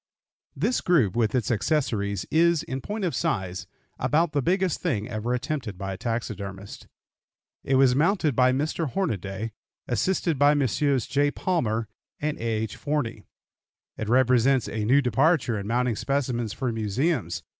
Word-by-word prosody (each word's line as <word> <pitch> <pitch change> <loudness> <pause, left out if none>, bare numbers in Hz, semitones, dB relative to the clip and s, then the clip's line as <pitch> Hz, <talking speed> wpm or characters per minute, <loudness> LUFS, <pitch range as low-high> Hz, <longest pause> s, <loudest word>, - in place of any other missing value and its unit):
This 210 - 0
group, 140 - +2
with 115 0 +1
its 120 -3 0
accessories, 105 - 0
is, 170 0 +3
in 130 +1 -5
point 210 +6 -3
of 175 - -1
size, 95 - -2 0.3
about 160 +1 +2
the 145 - +1
biggest 180 +3 0
thing 115 - -1
ever 110 +3 -3
attempted 125 -5 -3
by 95 0 -4
a - - -7
taxidermist. 100 -4 -5 0.8
It 135 - +1
was 130 -1 +5
mounted 160 - +2
by 125 +1 +4
Mr. 150 +3 -1
Hornaday, 110 - -3 0.4
assisted 165 +3 0
by 145 +1 +5
Messrs. 140 -1 +1
J. 145 0 +2
Palmer 115 - -1 0.3
and 150 0 -1
A. - - -9
H. 110 -1 -2
Forney. 120 -8 -2 0.7
It 110 - -4
represents 125 +1 +3
a 110 -1 -3
new 135 +5 +4
departure 130 -3 +2
in 100 - -6
mounting 120 0 +1
specimens 125 -4 -1
for 130 0 -2
museums. 115 - -1
125 Hz, 150 wpm, -26 LUFS, 110-150 Hz, 0.8 s, was